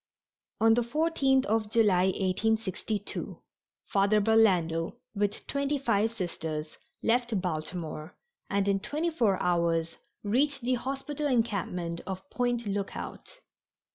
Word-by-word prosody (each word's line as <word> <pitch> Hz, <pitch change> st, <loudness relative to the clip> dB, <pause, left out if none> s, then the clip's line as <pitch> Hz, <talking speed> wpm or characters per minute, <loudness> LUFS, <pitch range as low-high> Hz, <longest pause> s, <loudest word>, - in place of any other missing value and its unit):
On 225 Hz, 0 st, +6 dB
the 240 Hz, -, +3 dB
14th 270 Hz, 0 st, +2 dB
of 215 Hz, 0 st, 0 dB
July, 210 Hz, -5 st, +4 dB
1862, 205 Hz, +2 st, -1 dB, 0.5 s
Father 200 Hz, +2 st, +3 dB
Burlando, 190 Hz, -6 st, +3 dB, 0.2 s
with 205 Hz, 0 st, -1 dB
twenty 280 Hz, +1 st, 0 dB
five 225 Hz, -5 st, +2 dB
Sisters, 160 Hz, -7 st, -5 dB, 0.2 s
left 235 Hz, -2 st, +2 dB
Baltimore, 160 Hz, -2 st, -4 dB, 0.3 s
and 200 Hz, 0 st, +1 dB
in 200 Hz, -1 st, +2 dB
twenty 305 Hz, -, -2 dB
four 225 Hz, -, +2 dB
hours 170 Hz, -2 st, +1 dB, 0.3 s
reached 275 Hz, +7 st, +1 dB
the 250 Hz, +2 st, +1 dB
hospital 275 Hz, +4 st, -2 dB
encampment 190 Hz, -9 st, -1 dB
of 190 Hz, -1 st, -5 dB
Point 245 Hz, -1 st, 0 dB
Lookout. 205 Hz, -, -5 dB
210 Hz, 110 wpm, -29 LUFS, 185-245 Hz, 0.5 s, On